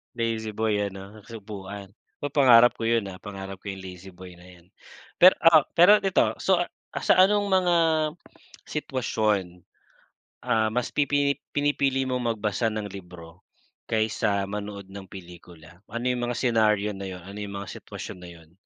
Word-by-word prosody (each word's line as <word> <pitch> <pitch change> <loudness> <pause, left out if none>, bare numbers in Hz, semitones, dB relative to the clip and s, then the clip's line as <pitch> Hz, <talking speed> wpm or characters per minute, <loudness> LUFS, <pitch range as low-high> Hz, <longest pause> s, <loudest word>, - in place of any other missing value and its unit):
Lazy 115 -2 -2
boy 110 0 0 0.2
ano, 100 +3 -11
tapos 115 - -16
upuan? 100 -1 -9 0.3
Pa 145 - -3
pangarap 125 -4 +6
ko 115 - -7
yun, 115 -3 +1
ah, 95 - -8
pangarap 95 -1 -8
ko 100 - -4
yung 95 - -8
lazy 95 0 -10
boy 90 0 -12
na 85 - -17 0.2
yan. 85 - -24 0.5
Pero, 185 +1 +8
ah, 165 -3 +7
pero 200 +5 +7
ito 190 -1 +2
so 190 -2 +2
uh, 175 - -1 0.4
sa - - +4
anong 205 +1 +2
mga 185 -2 +2 0.9
sitwasyon, 105 - -2 0.8
ah, 110 -3 +2
mas 120 +2 -2
pipini 145 -1 +1 0.2
pinipili 140 -2 +1
mong 125 -3 -1
magbasa 105 +2 -1
ng 110 -1 -4
libro 90 -2 -12 0.5
kaysa 110 -2 0
manood 100 -1 -7
ng 95 -1 -9
pelikula? 85 -2 -13
Ano 115 +3 -5
yung 120 -1 -2
mga 120 - -2
senaryo 105 -4 +2
na 95 0 -7
yun? 90 -2 -8
Ano 100 +2 -9
yung 100 -1 -6
mga 95 - -9
sitwasyon 90 - -9
na 90 -1 -11
yun? 80 -2 -16
105 Hz, 165 wpm, -25 LUFS, 95-125 Hz, 0.9 s, Pero